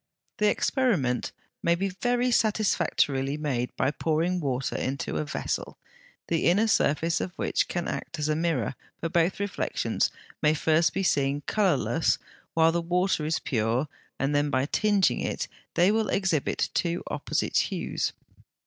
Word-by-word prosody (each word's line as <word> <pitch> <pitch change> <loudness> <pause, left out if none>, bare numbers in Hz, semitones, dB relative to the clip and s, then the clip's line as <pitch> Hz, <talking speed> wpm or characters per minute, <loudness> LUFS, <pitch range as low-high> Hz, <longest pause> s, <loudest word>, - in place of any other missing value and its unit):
The 210 0 +4
experiment 190 - +1 0.3
may 170 0 +3
be 195 +3 -1
very 245 +6 0
satisfactorily 170 - +1
made 130 -5 -1
by 140 - +1
pouring 165 +4 0
water 135 -4 -2
into 135 +2 -2
a 155 - -1
vessel, 145 - -3 0.5
the 165 -1 0
inner 195 +6 +4
surface 165 -6 +2
of 180 - -4
which - - 0
can 175 -2 -3
act 170 - -4
as 150 -1 -1
a 155 - +1
mirror; 160 -8 0 0.3
for 165 - -2
both 170 +2 +1
reflections 200 0 -1 0.3
may 155 0 +4
first 160 +2 +3
be 195 - 0
seen 140 -4 +1
colourless 185 -2 +1 0.4
while 165 0 +5
the 170 +1 0
water 180 -1 +1
is 160 - +1
pure, 115 +3 0 0.3
and 135 +2 0
then 145 0 +2
by 130 -1 +1
tinging 205 +4 +2
it, - - -2 0.3
they 180 +4 +5
will 220 0 +1
exhibit 190 -7 0
two 170 0 0
opposite - - -1
hues. - - -2
165 Hz, 150 wpm, -27 LUFS, 145-190 Hz, 0.5 s, while